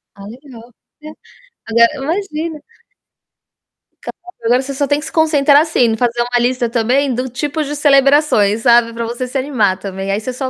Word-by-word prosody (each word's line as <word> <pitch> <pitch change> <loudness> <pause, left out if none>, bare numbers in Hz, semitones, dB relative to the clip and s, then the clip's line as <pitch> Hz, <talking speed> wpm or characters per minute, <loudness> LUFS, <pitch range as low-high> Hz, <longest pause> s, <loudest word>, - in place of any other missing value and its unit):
Ah, 200 - -12
legal. 240 0 -14 0.3
É, - - -9 0.6
agora 230 +1 +4
imagina. 320 0 -4 1.4
Claro, - - -9 0.3
agora 245 +2 +2
você 275 +1 -6
só 280 +1 -2
tem 290 +2 +1
que 300 - -8
se - - -8
concentrar, 295 -3 +3
assim, 315 -4 -1
em 225 -2 +2
fazer 240 0 -1
uma 245 0 0
lista 245 0 0
também 250 +4 0
do 255 +2 -3
tipos 295 +4 -4
de 295 - -5
celebrações, 275 -7 +3
sabe, 235 -1 +3
pra 230 0 -4
você 240 +2 -5
se 260 +2 -4
animar 240 -9 0
também. 195 0 -6
Aí 200 - -1
você 250 +4 -6
só 260 +1 -4
255 Hz, 185 wpm, -16 LUFS, 235-290 Hz, 1.4 s, agora